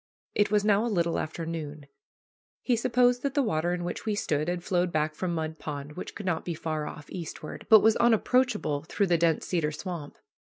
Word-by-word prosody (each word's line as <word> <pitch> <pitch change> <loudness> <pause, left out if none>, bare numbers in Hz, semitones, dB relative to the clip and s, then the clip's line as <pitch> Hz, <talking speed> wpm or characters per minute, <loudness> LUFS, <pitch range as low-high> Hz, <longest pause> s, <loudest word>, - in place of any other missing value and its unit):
It 205 - +2
was 210 -1 +2
now 210 0 +4
a - - 0
little 170 -5 +1
after 160 +1 -4
noon. 155 -3 -5 0.8
He 250 - +2
supposed 245 +1 +3
that 280 +1 -2
the 285 - +3
water 175 -6 0
in 175 0 -2
which 175 - -4
we 215 -2 -1
stood 150 -6 -1
had 175 0 -2
flowed 180 -2 +1
back 155 0 0
from 175 +1 -2
Mud 160 0 -3
Pond, 145 -1 -6
which 165 - -7
could 205 - -7
not 170 -3 0
be 170 - -3
far 155 -2 -3
off 150 - -9
eastward, 165 -3 -7
but 220 -2 +9
was 220 0 +5
unapproachable 235 - +2
through 200 - +1
the 175 -3 +2
dense 165 -2 +2
cedar 165 -4 0
swamp. 155 -1 -6
175 Hz, 210 wpm, -28 LUFS, 155-210 Hz, 0.8 s, but